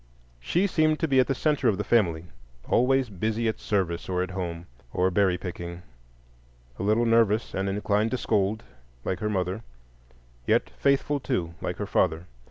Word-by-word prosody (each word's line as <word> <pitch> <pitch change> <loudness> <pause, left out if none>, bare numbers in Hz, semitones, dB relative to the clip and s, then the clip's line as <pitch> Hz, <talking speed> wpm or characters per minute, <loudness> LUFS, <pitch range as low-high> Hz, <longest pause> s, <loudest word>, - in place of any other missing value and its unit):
She 175 - +1
seemed 155 -5 +2
to 160 - +2
be 135 -3 +5
the 135 +1 0
centre 150 -2 +1
of 105 -4 +3
the 105 - -2
family: 90 -7 +2 0.4
always 130 +1 +3
busy 110 +4 -1
at 110 - -1
service, 90 -5 -1
or 90 0 0
at 95 - -5
home, 85 -3 -4 0.3
or 90 +6 +1
berry 95 -1 +2
picking; 85 -1 -7 1.0
a - - -3
little 110 +4 +2
nervous 115 -1 +3
and 95 +1 -1
inclined 105 +2 +1
to 130 - -1
scold, 105 -1 0 0.4
like 95 - -1
her 105 - -1
mother, 95 0 -1 0.9
yet - - +2
faithful, 140 +1 +1
too, 85 -9 -2
like - - -3
her - - -3
father. 85 -1 +1
105 Hz, 170 wpm, -26 LUFS, 90-120 Hz, 1.0 s, be